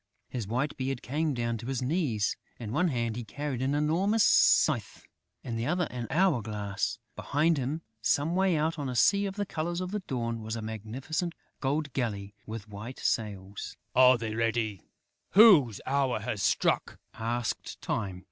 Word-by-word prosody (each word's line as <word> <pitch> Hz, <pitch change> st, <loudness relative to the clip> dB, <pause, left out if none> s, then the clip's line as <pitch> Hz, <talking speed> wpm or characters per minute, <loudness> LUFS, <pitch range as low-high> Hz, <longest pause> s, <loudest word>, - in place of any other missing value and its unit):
His 120 Hz, -6 st, -4 dB
white 125 Hz, +7 st, -1 dB
beard 130 Hz, -1 st, -3 dB
came 150 Hz, +2 st, -1 dB
down 115 Hz, -1 st, -1 dB
to 115 Hz, -, -7 dB
his 135 Hz, -2 st, -1 dB
knees. 130 Hz, -, 0 dB, 0.2 s
In 110 Hz, -3 st, -6 dB
one 180 Hz, +9 st, +2 dB
hand, 120 Hz, -6 st, -1 dB
he 120 Hz, -, -4 dB
carried 135 Hz, +3 st, -4 dB
an 135 Hz, +2 st, +1 dB
enormous 180 Hz, +9 st, +2 dB
scythe; -, -, +4 dB, 0.4 s
in 115 Hz, -2 st, -4 dB
the 115 Hz, +2 st, -2 dB
other, 175 Hz, -2 st, +1 dB
an 120 Hz, -2 st, -4 dB
hour 165 Hz, -6 st, +3 dB
glass. 100 Hz, -, -3 dB, 0.2 s
Behind 155 Hz, +2 st, +1 dB
him, 145 Hz, +6 st, -3 dB, 0.2 s
some 150 Hz, +9 st, +1 dB
way 190 Hz, -3 st, +3 dB
out, 160 Hz, +2 st, 0 dB
on 140 Hz, -2 st, -2 dB
a 125 Hz, -, -4 dB
sea 200 Hz, -, +4 dB
the 205 Hz, +1 st, -3 dB
colour 170 Hz, -1 st, -3 dB
of 185 Hz, 0 st, -3 dB
the 210 Hz, 0 st, -2 dB
Dawn, 115 Hz, -3 st, -2 dB
was 110 Hz, +1 st, -4 dB
a 115 Hz, -, -4 dB
magnificent 125 Hz, -, -4 dB, 0.2 s
gold 140 Hz, 0 st, -1 dB
galley, 105 Hz, -6 st, -2 dB
with 110 Hz, -1 st, -6 dB
white 105 Hz, +5 st, -8 dB
sails. 100 Hz, -3 st, -3 dB, 0.2 s
"Are 130 Hz, 0 st, +7 dB
they 110 Hz, -2 st, -4 dB
ready 115 Hz, -3 st, 0 dB, 0.5 s
whose 175 Hz, -, +7 dB
hour 135 Hz, -4 st, +1 dB
has 110 Hz, -2 st, -3 dB
struck?" 85 Hz, -1 st, +1 dB, 0.2 s
asked 115 Hz, +1 st, -3 dB
Time. 95 Hz, -5 st, -3 dB
125 Hz, 170 wpm, -29 LUFS, 110-155 Hz, 0.5 s, Are